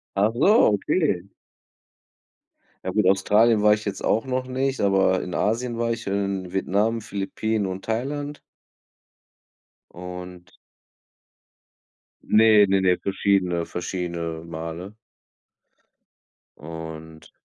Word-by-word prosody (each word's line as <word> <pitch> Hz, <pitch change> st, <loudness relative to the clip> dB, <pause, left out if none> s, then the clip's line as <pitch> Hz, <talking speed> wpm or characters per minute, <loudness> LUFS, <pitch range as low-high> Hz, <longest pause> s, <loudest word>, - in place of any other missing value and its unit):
Ach 105 Hz, +3 st, +3 dB
so, 150 Hz, -, +4 dB
okay. 100 Hz, -, 0 dB, 1.6 s
Ja -, -, -2 dB
gut, 90 Hz, -, +2 dB
Australien 105 Hz, +3 st, +4 dB
war 105 Hz, 0 st, +6 dB
ich 105 Hz, 0 st, -3 dB
jetzt 100 Hz, -1 st, -4 dB
auch 115 Hz, -, +1 dB
noch 130 Hz, 0 st, -2 dB
nicht, 135 Hz, +1 st, -1 dB
aber 95 Hz, -2 st, +3 dB
in 90 Hz, -, -6 dB
Asien 115 Hz, +2 st, -1 dB
war 115 Hz, 0 st, 0 dB
ich, 115 Hz, -, -5 dB
und 100 Hz, -1 st, -1 dB
in 90 Hz, -, -11 dB
Vietnam, 105 Hz, +4 st, 0 dB
Philippinen 105 Hz, +2 st, -2 dB
und 95 Hz, 0 st, -5 dB
Thailand. 145 Hz, +6 st, -3 dB, 1.5 s
Und 90 Hz, 0 st, -10 dB, 1.7 s
Ne, 110 Hz, -1 st, +5 dB
ne, 95 Hz, 0 st, +2 dB
ne, 90 Hz, -1 st, +3 dB
verschiedene 95 Hz, -3 st, 0 dB
verschiedene 85 Hz, -2 st, -4 dB
Male. 85 Hz, +5 st, -7 dB, 1.6 s
Und 80 Hz, 0 st, -9 dB
100 Hz, 105 wpm, -24 LUFS, 90-110 Hz, 1.7 s, war